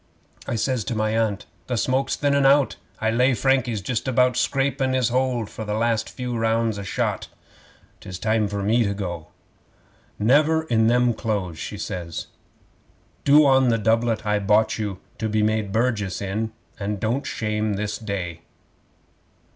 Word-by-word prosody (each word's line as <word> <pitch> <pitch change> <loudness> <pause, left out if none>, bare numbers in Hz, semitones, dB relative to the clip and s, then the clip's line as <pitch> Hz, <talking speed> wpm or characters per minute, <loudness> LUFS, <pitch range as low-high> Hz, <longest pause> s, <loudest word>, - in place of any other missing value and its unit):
I - - -1
says 125 +1 0
to 120 - -2
my 110 0 0
Aunt, 110 -3 0 0.2
"The 125 - -1
smoke's 130 +4 +1
thinnin' 140 -1 +2
out. 140 0 +4 0.2
I 110 0 +1
lay 125 +3 +3
Frankie's 130 -5 +1
just 115 +5 -2
about 125 -1 +3
scrapin' 135 0 0
his 130 -3 +2
hold 125 -2 0
for 110 - -9
a - - -4
few 105 - -1
last 110 -2 0
rounds 115 -3 0
shot. - - -2 0.7
'Tis 90 -1 -8
time 110 +1 +1
for 100 0 -3
me 115 +4 +3
to 100 -2 -1
go." 85 -6 -5 0.9
'"Never 150 +8 +3
in 110 -7 +2
them 120 0 +3
clothes," 100 -8 -3
she - - -5
says. 85 -3 -5 1.0
"Do 145 +2 +7
on 130 -2 +4
the 115 - +2
doublet 115 +1 +1
I 105 0 +1
bought 105 +2 +2
you 105 -3 -3 0.2
to 110 - -1
be 105 0 +1
made 110 -2 0
burgess 110 -4 0
in, 105 +3 -3 0.3
and 100 0 -3
don't 115 +7 0
you - - -5
shame 105 -1 -1
this 105 +1 -3
day." 90 -6 -4
110 Hz, 165 wpm, -23 LUFS, 105-125 Hz, 1.0 s, Do